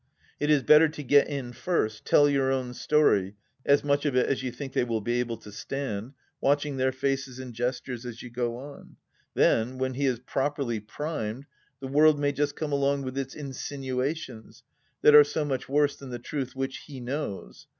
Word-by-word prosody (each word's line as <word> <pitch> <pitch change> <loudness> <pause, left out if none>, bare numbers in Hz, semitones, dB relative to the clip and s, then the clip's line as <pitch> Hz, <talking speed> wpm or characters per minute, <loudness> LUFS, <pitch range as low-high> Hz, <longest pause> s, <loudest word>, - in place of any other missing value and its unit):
It 150 - 0
is 145 -3 +4
better 155 +1 +7
to 150 -1 -8
get 145 +2 +5
in 135 -4 -5
first, 120 -5 -1
tell 145 - +5
your 135 -2 +2
own 130 -2 -2
story 105 -9 +2
— 130 - -41
as 140 - +3
much 140 0 +1
of 145 -4 0
it 125 - +4
as 135 - -1
you 130 -1 -3
think 135 +2 -7
they - - +2
will 115 -2 -1
be 120 +3 -1
able 120 -2 -2
to 105 - -13
stand 125 0 -5
— - - -31
^watching 145 0 +1
their 130 0 +2
faces 135 -1 -2
and 130 -2 -8
gestures 125 +1 -3
as 120 -2 -7
you 125 - -9
go 120 -1 -2
on.... 140 +3 -11 0.4
Then 120 +4 +2
when 130 0 -1
he 140 +2 0
is 125 -2 +1
properly 135 -1 -2
primed, 115 +1 -5 0.4
the 135 - -4
world 150 +2 +5
may 145 0 +2
just 145 0 -1
come 155 -2 -3
along 140 0 +1
with 130 0 -5
its 135 -1 -4
insinuations, 135 -2 -5 0.4
that 150 - +7
are 150 0 +11
so 150 +1 -2
much 130 -3 -3
worse 145 0 +2
than 135 -2 -10
the 120 - -4
truth 130 +1 -5
which 135 0 -3
he 140 -3 -8
knows. 125 -4 -5
135 Hz, 205 wpm, -27 LUFS, 125-145 Hz, 0.4 s, are